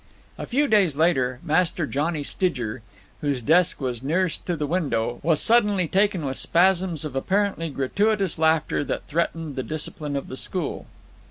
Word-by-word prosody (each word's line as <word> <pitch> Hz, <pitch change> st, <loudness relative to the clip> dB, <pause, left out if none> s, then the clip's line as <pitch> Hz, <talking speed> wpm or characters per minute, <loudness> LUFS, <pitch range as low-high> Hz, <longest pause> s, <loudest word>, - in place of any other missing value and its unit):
A -, -, -5 dB
few 285 Hz, +4 st, +1 dB
days 200 Hz, -, +3 dB
later, 130 Hz, -6 st, +1 dB
Master 170 Hz, +1 st, +1 dB
Johnny 150 Hz, +2 st, -1 dB
Stidger, 125 Hz, -, -2 dB, 0.4 s
whose 145 Hz, -3 st, 0 dB
desk 165 Hz, +8 st, +3 dB
was 125 Hz, -4 st, -3 dB
nearest 165 Hz, +5 st, -1 dB
to 175 Hz, -, 0 dB
the 150 Hz, -, -1 dB
window, 140 Hz, -8 st, -1 dB
was 160 Hz, 0 st, +2 dB
suddenly 205 Hz, -6 st, +3 dB
taken 190 Hz, -3 st, +1 dB
with 135 Hz, -1 st, -3 dB
spasms 175 Hz, -2 st, +2 dB
of 145 Hz, -4 st, -6 dB
apparently 190 Hz, +2 st, 0 dB
gratuitous 195 Hz, +7 st, 0 dB
laughter 160 Hz, -2 st, +2 dB
that -, -, -4 dB
threatened 165 Hz, -1 st, -2 dB
the 130 Hz, -, -2 dB
discipline 150 Hz, 0 st, -4 dB
of 140 Hz, -, -3 dB
the 130 Hz, -, -7 dB
school. 180 Hz, +1 st, -4 dB
160 Hz, 160 wpm, -24 LUFS, 140-185 Hz, 0.4 s, days